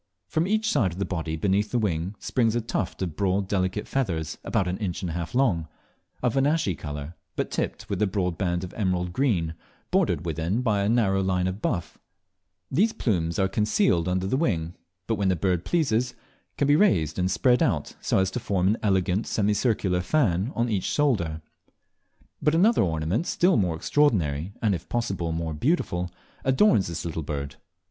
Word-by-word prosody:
From 160 +3 0
each 215 +2 +1
side 95 - +2
of - - -10
the 100 - -1
body 80 -3 -3
beneath 100 +5 +1
the 125 - 0
wing, 95 -3 -1
springs 115 -3 0
a 120 - +1
tuft 105 -4 -3
of 85 -4 -4
broad 100 0 0
delicate 95 +1 -1
feathers 85 - -2
about 95 - 0
an 90 +1 -2
inch 95 -2 -3
and 90 - -2
a - - -5
half 85 +5 -4
long, 100 -12 +2 0.6
of 125 0 +1
an 135 +1 +3
ashy 150 - +1
colour, 75 0 -6 0.2
but - - -2
tipped - - -3
with - - -3
a 105 - +4
broad 90 -3 -1
band 90 -1 -1
of 90 - -7
emerald 90 -4 -1
green, 90 - +1 0.4
bordered 80 - +1
within 85 +8 -1
by 105 -4 +2
a 100 - +1
narrow 100 -5 +2
line 90 -1 +1
of 95 +3 -3
buff: 85 -5 -2 0.7
These 205 +11 +3
plumes 85 -7 -1
are 95 -2 +3
concealed 105 - +2
beneath 90 +1 -1
the 130 - +2
wing, 85 - 0 0.3
but 115 - -1
when 100 -1 +1
the 95 - +2
bird 90 0 0
pleases, 125 -7 +1 0.4
can 140 - +2
be 145 - +5
raised 95 - +2
and 90 0 +1
spread 125 +6 +3
out 80 -9 0
so - - +1
as 95 0 +2
to 125 - -3
form 95 -4 +1
an 110 - +2
elegant 95 0 +1
semicircular 105 -3 +1
fan 100 - +1
on 120 0 +1
each 105 -5 -1
shoulder. 85 - 0 1.0
But 150 - +2
another 210 +8 +4
ornament 85 - 0
still 180 0 +3
more 90 -5 +1
extraordinary, 90 - +1
and 105 -3 +3
if 85 - -5
possible 95 -8 -1
more 80 -1 -2
beautiful, 90 - 0 0.3
adorns 130 - +4
this 85 -1 -5
little 80 -1 -3
bird. 70 -1 -5
95 Hz, 190 wpm, -26 LUFS, 85-115 Hz, 1.0 s, be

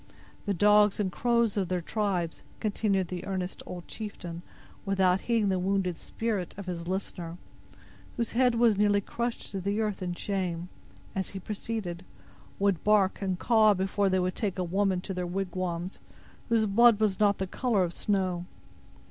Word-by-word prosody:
The 200 - +2
dogs 210 +2 +5
and 195 -3 0
crows 235 0 +1
of 190 -3 +1
their 180 0 0
tribes," 180 -2 -1 0.2
continued 200 -4 0
the 180 -1 -4
earnest 190 -1 -3
old 175 -1 -7
chieftain, 180 -6 -6 0.4
without 190 -1 +2
heeding 225 -4 +1
the 190 -1 +1
wounded 190 -1 0
spirit 210 -1 -3
of 200 - -6
his 170 -2 -5
listener, 175 -2 -4 0.8
whose 235 -1 -1
head 245 0 +3
was 230 -3 +4
nearly 205 -1 +4
crushed 235 +4 -4
to 195 -1 -3
the 200 +3 -1
earth 210 -3 -1
in 175 -1 -2
shame, 180 -3 -2 0.4
as 190 -1 -2
he 195 - -6
proceeded, 200 -3 -4 0.5
"would 200 -4 +1
bark 205 -2 +3
and 190 -2 -1
caw 215 -1 +5
before 195 +1 +1
they 185 0 +2
would 185 0 0
take 200 -5 -2
a 185 - 0
woman 190 +1 +1
to 190 - -5
their 180 -1 -2
wigwams 180 -1 -3 0.5
whose 225 -1 +3
blood 225 +2 +6
was 210 -3 +1
not 205 -1 +4
of - - -28
the 190 - -1
color 215 0 +1
of 175 -1 -2
snow. 185 -3 -1
195 Hz, 175 wpm, -29 LUFS, 180-210 Hz, 0.8 s, blood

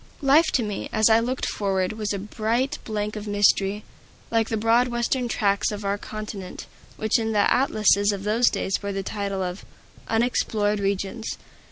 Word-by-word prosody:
Life 295 +4 +5
to 245 - +2
me, 210 -2 -4
as 220 +1 +4
I 220 - +6
looked 250 +3 -2
forward, 190 -1 -1
was 215 -1 -3
a 200 - -1
bright 220 +6 -1
blank 210 -1 -3
of 210 0 -6
mystery, 205 0 +2 0.5
like 225 -1 +1
the 225 - -1
broad 230 +3 +3
Western 240 +1 -1
tracts 200 -3 +1
of 205 -1 -6
our 200 +1 -1
continent, 210 -4 -7 0.3
which 220 +1 +1
in 225 -1 -1
the 205 -1 +3
atlases 210 -5 +3
of 195 -1 -5
those 220 +4 +3
days 190 - -1
bore 200 0 -4
the 195 0 -3
title 200 -1 -3
of 180 +1 -5 0.4
"Unexplored 220 -3 +1
Regions." 200 +3 -2
210 Hz, 175 wpm, -24 LUFS, 200-225 Hz, 0.5 s, I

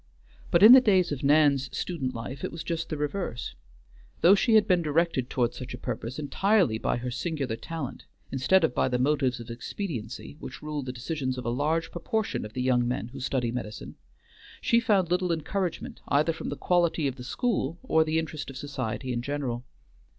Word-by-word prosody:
But 170 - +4
in 220 - +11
the 260 0 +11
days 190 -7 +3
of 145 -1 -4
Nan's 140 -2 +4
student 135 -9 -3
life 125 +4 -6
it - - -2
was 165 - -6
just 165 -1 -3
the 155 - -3
reverse. 150 - -3 0.7
Though 180 - +7
she 220 +3 +3
had 215 - +5
been 180 -2 +3
directed 155 -4 0
toward 120 -2 0
such 125 -1 -7
a - - -11
purpose 125 0 -5
entirely 165 - +2
by - - 0
her 125 +1 -4
singular 135 -2 -2
talent, 145 0 -6 0.2
instead 140 +8 +3
of 145 - +2
by - - +2
the 125 -1 0
motives 130 -1 +1
of 115 0 -8
expediency 120 - -6
which - - -9
rule 150 -1 -3
the 130 -1 -5
decisions 130 +1 -3
of 125 - -5
a 120 - 0
large 155 +6 0
proportion 220 - -2
of 105 - -9
the 125 - -2
young 125 -2 +2
men 120 -1 -2
who 135 +2 -9
study 125 -2 -1
medicine, 110 -3 -6 0.7
she 235 - +3
found 200 -7 +2
little 180 0 +1
encouragement 170 +2 -3
either 150 +4 +2
from - - -6
the - - -4
quality 170 -4 +2
of 135 0 -4
the 125 - -8
school 170 - -1
or 160 -11 +3
the 155 0 -1
interest 155 -3 -3
of 135 - -8
society 130 -2 -4
in 120 - -1
general. 130 -3 -3
145 Hz, 200 wpm, -27 LUFS, 125-170 Hz, 0.7 s, in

